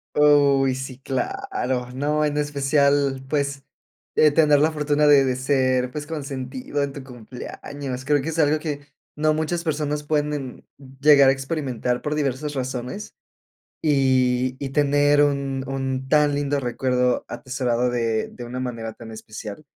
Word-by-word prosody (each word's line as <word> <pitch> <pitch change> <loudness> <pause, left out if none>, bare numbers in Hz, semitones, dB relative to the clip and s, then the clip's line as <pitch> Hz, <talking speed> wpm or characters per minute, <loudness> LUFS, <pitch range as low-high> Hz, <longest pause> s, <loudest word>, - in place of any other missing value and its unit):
Uy, 140 -3 +4
sí 130 -1 -6
claro. 130 -1 -3
No, 150 +3 0
en 150 0 0
especial, 140 -1 +1
pues, 140 -1 -1 0.5
eh, 155 - +6
tener 150 -1 +4
la 155 +3 +3
fortuna 150 0 +1
de 145 -2 +6
de 130 -1 0
ser, 130 -1 +1
pues, 145 +1 -5
consentido 140 -2 -4
en 140 -1 -2
tu 140 -1 -9
cumpleaños. 130 +2 -7
Creo 145 0 +2
que 160 - -3
es 165 - -5
algo 155 0 +3
que 145 -2 -5 0.3
no 155 +1 +2
muchas 160 +2 -2
personas 150 -2 -1
pueden 145 -3 -2 0.3
llegar 140 -2 +7
a - - +6
experimentar 135 -3 -2
por 150 - -2
diversas 145 0 -2
razones, 130 +8 -5 0.7
y 130 -3 +2
y 135 - -3
tener 145 +1 +3
un 140 -2 -1
un 135 -1 -3
tan 150 0 +3
lindo 145 0 0
recuerdo 125 0 0
atesorado 125 -2 -1
de 115 -2 0
de 120 - -10
una 125 +2 -5
manera 115 -3 -4
tan 115 -1 -11
especial, 110 +4 -9
140 Hz, 150 wpm, -23 LUFS, 130-150 Hz, 0.7 s, llegar